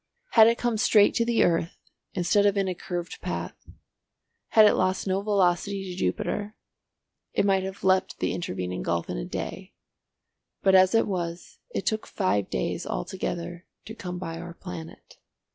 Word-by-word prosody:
Had 220 -1 +8
it 230 +1 +3
come 240 -2 0
straight 210 -2 +5
to 230 - +1
the 235 -1 +3
earth 170 -1 +1 0.4
instead 200 +3 +3
of 200 0 +1
in 195 -1 +1
a 185 - -1
curved 175 0 -6
path, - - -5 0.8
had 220 -1 +6
it 210 - +6
lost 185 0 0
no 190 0 0
velocity 200 -1 +1
to 185 -2 -6
Jupiter, 205 - -2 0.8
it - - +2
must 195 -1 +2
have 190 0 -7
leapt 190 0 +2
the - - -1
intervening 90 - -4
gulf 85 -1 -2
in - - -3
a - - -4
day, - - -6 0.9
but 190 - +4
as 185 +2 +6
it 225 - +4
was 175 -3 -4
it - - -4
took 220 -1 -1
five 105 - 0
days - - -2
altogether 170 - -4 0.2
to 220 - -7
come 180 -5 -6
by 165 -2 -5
our 170 0 -8
planet. 170 -3 -10
185 Hz, 170 wpm, -26 LUFS, 170-205 Hz, 0.9 s, Had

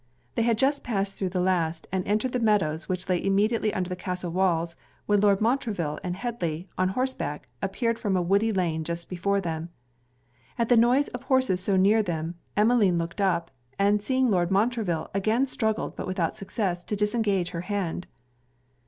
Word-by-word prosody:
They - - 0
had 230 -1 +2
just 275 +4 +1
passed 200 -3 -1
through 190 - -2
the 180 0 -2
last, 170 -3 0
and 190 0 0
entered 215 +5 +1
the 250 - 0
meadows 195 -9 +1
which 185 +1 -3
lay 180 -2 0
immediately 210 +3 +2
under 185 -2 -2
the 180 - -3
castle 180 -1 -4
walls, 170 -2 +1 0.3
when 205 -1 +3
Lord 200 -1 +4
Montreville 215 - 0
and 180 -1 -2
Headly, 185 -7 -3
on 185 0 +1
horseback, 190 - -3
appeared 230 +4 -1
from 200 -4 0
a - - +2
woody 200 +5 +2
lane 170 -5 0
just 170 +1 -4
before 200 +3 0
them. 165 -2 -4 0.9
At 230 -1 0
the 245 - +6
noise 245 +5 +4
of 245 - -6
horses 260 -8 +2
so 195 +1 +2
near 205 +4 +5
them, 165 -4 -3 0.2
Emmeline 210 -4 +4
looked 170 +4 -3
up, 170 -4 +1 0.3
and 205 +1 +3
seeing 260 +1 +2
Lord 175 -3 +2
Montreville, 205 -4 0
again 215 +6 +2
struggled, 220 -4 -1
but - - -5
without 185 -3 -1
success, 190 -3 -2
to 210 - -2
disengage 210 -3 0
her 170 - -4
hand. 180 -2 -3
195 Hz, 180 wpm, -26 LUFS, 175-220 Hz, 0.9 s, the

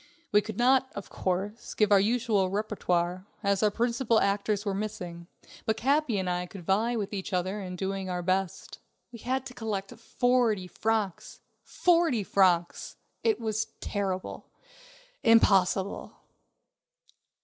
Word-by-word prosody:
We 210 - +5
could 220 +1 -7
not, 260 +2 +3
of 200 - -7
course, 195 +4 -3
give 210 -1 +2
our 200 - +7
usual 215 -2 +1
repertoire, 185 -3 -1 0.2
as 200 -1 +1
our 215 - +4
principal 235 +1 +1
actors 205 +1 0
were 200 - 0
missing, 185 -5 -5 0.4
but 220 0 +1
Capi 275 -2 +1
and 190 -1 -2
I 180 0 -1
could 180 -2 -11
vie 220 +6 +1
with 210 -2 -3
each 195 0 -4
other 185 +3 -1
in 180 -1 -6
doing 190 0 -3
our 180 -1 -3
best. 185 0 -2 0.3
We 235 - -10
had 260 +3 -2
to 255 - -8
collect 210 -5 -4
forty 240 -5 +1
francs! 210 0 -2 0.2
Forty 335 - +2
francs! 180 -3 +1 0.3
It 445 -2 +2
was 220 -1 -1
terrible! 195 -3 -3 0.7
Impossible! 200 -4 +3
205 Hz, 140 wpm, -28 LUFS, 190-230 Hz, 0.7 s, our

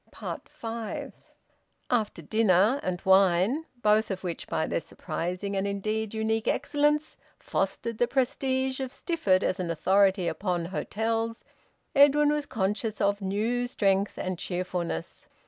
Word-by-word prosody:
FIVE. 225 -1 -5 0.8
After 215 -8 0
dinner, 215 - +3
and 180 -1 -2
wine, 190 - +4 0.2
both 215 +1 +4
of 190 -1 -4
which, 175 -2 -4
by 160 - 0
their - - -1
surprising 180 +5 -4
and 195 +1 0
indeed 215 +2 -2
unique 220 0 0
excellence, 295 +2 +1 0.2
fostered 230 -2 -2
the 240 - +3
prestige 265 0 0
of 260 -1 -3
Stifford 265 - +1
as 185 - 0
an 180 -2 -2
authority 190 +2 +3
upon 180 -2 -1
hotels, 225 +5 -2 0.5
Edwin 290 +1 +6
was 295 -1 -2
conscious 210 +1 -2
of 200 0 +1
new 220 +6 0
strength 200 -4 +1
and 185 -2 -3
cheerfulness. 175 - -4
210 Hz, 130 wpm, -28 LUFS, 185-245 Hz, 0.8 s, Edwin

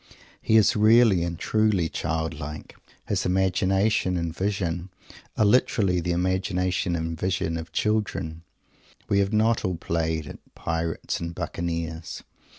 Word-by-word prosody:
He 110 - +4
is 105 -3 +4
really 110 -3 +5
and 85 -1 -3
truly 105 -5 +1
childlike. 80 -1 -4 0.3
His - - 0
imagination 95 +1 +1
and 85 -1 -3
vision 95 -3 -2 0.5
are 110 - +4
literally 100 -4 +3
the 85 +1 -3
imagination 90 0 0
and 80 0 -3
vision 90 -1 -1
of 80 0 -6
children. 105 -7 -1 0.7
We 100 - +3
have 100 0 +1
not 110 +1 +2
all 90 -1 -1
played 80 -2 -1
at - - -13
Pirates 80 0 -2
and 85 0 -5
Buccaneers. 85 -1 -4
90 Hz, 130 wpm, -25 LUFS, 80-100 Hz, 0.7 s, really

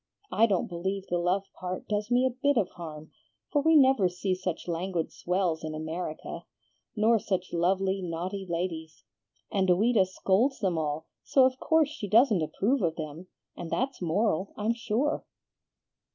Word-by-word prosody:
I 225 +2 +4
don't 195 -5 +1
believe 190 +3 -3
the 175 -2 -1
love 180 +3 +1 0.2
part 185 0 -5
does 210 +1 -1
me 250 +1 +3
a 260 - +2
bit 275 +2 +1
of 200 -5 +2
harm, 155 -2 -9 0.4
for 290 - +2
we 320 +2 +4
never 265 -9 +5
see 180 +2 -2
such 185 -2 -4
languid 170 0 -2
swells 180 -3 -1
in 155 0 -4
America, 160 +1 -5 0.5
nor 225 +1 +4
such 185 -3 -3
lovely, 190 +3 +1
naughty 180 +3 -4
ladies; 165 -2 -4 0.5
and 190 -2 +1
Ouida 200 +2 +4
scolds 200 +8 +1
them 190 -4 0
all, 155 0 -2 0.2
so 265 -2 +4
of 260 0 0
course 320 -3 +3
she 255 -9 -6
doesn't 220 -3 +5
approve 220 - 0
of 165 -3 0
them, 155 +2 -7 0.3
and 170 - -7
that's 265 +4 -2
moral, 185 +2 0
I'm 215 +2 +1
sure." 235 +5 -1
190 Hz, 165 wpm, -28 LUFS, 170-230 Hz, 0.5 s, never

